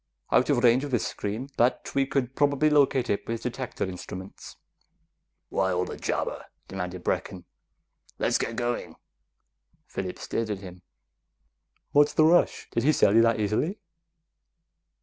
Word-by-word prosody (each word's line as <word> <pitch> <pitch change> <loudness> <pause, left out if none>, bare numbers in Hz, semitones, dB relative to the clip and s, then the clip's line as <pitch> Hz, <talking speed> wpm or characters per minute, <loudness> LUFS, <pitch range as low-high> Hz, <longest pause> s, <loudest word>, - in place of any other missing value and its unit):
"Out 125 - +3
of 130 -4 +2
range 125 +2 +5
of 145 - -4
this 120 -4 0
screen, 110 +7 -4
but 120 +2 +1
we 135 -1 +2
could 130 -2 -1
probably 145 +1 +2
locate 140 -4 +3
it 100 - -2
with 115 0 -3
detector 125 0 -4
instruments." 95 0 -8 0.9
"Why 95 -1 +1
all 90 0 0
the - - -6
jabber?" - - -3 0.2
demanded 90 0 -5
Brecken. 90 -2 -2 0.7
"Let's - - +1
get 115 - -2
going!" 120 +1 -3 0.9
Phillips - - -6
stared 115 -1 -2
at 105 - -2
him. 90 -2 -11 1.1
"What's 145 0 +4
the 155 - +5
rush? 175 +2 +3
Did 115 - 0
he 145 +6 +4
sell 100 -9 +4
you 115 - +7
that 115 -1 +3
easily?" 110 - 0
120 Hz, 150 wpm, -27 LUFS, 100-140 Hz, 1.1 s, you